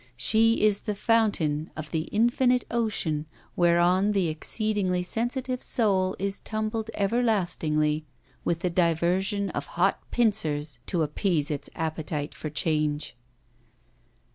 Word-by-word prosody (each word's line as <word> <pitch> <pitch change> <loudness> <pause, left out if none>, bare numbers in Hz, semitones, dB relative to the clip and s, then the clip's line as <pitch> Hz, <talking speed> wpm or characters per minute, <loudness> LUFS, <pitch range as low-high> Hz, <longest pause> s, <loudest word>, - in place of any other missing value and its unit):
She 220 - +3
is 205 -1 +3
the 210 -2 -3
fountain 200 -10 +1
of 155 -1 -6
the 160 0 -1
infinite 245 +3 +2
ocean 190 -10 -1 0.3
whereon 175 +4 +3
the 190 -5 +1
exceedingly 185 +2 0
sensitive 250 +5 -1
soul 190 -5 +1
is 195 +1 -2
tumbled 220 0 -3
everlastingly, 175 -9 +1 0.4
with 170 -1 -1
the 180 - 0
diversion 180 +4 +1
of - - -4
hot 190 +3 +3
pincers 155 - 0
to 170 -3 +1
appease 155 0 0
its 145 - -4
appetite 155 -2 -3
for 155 - -6
change. 150 -1 -1
185 Hz, 115 wpm, -26 LUFS, 155-215 Hz, 0.4 s, She